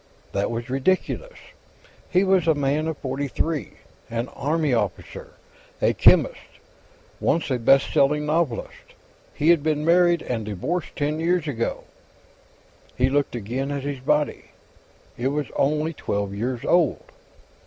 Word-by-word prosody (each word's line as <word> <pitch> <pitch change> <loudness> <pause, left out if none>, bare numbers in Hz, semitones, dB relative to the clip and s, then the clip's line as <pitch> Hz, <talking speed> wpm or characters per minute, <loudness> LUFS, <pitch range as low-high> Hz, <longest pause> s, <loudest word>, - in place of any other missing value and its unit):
That 100 +1 -1
was 115 +1 -4
ridiculous. 185 - -1 0.7
He 185 +1 +3
was 190 -3 +2
a 160 - +4
man 145 +2 0
of 160 -2 -3
forty 135 +1 -3
three; 155 +3 -2 0.4
an 115 +2 -3
army 150 -1 -1
officer, 485 - -3 0.5
a - - +2
chemist, - - +5 0.8
once 160 -3 0
a 125 - 0
best 135 +4 +4
selling 150 +2 +3
novelist. 150 -5 -2 0.4
He 155 - 0
had 170 -3 +5
been 150 0 0
married, 175 0 +4
and 115 -3 -3
divorced 105 - -3
ten 150 +2 -1
years 170 -1 +1
ago. 115 -5 -2 1.1
He 130 +1 +2
looked 140 -2 0
again 120 +5 -3
at 140 -1 -3
his 140 -1 -4
body. 150 +3 0 0.7
It 125 - 0
was 145 +1 -2
only 155 +3 +1
twelve 100 -7 -3
years 120 +4 -3
old. 175 -6 +2
145 Hz, 140 wpm, -24 LUFS, 130-160 Hz, 1.1 s, chemist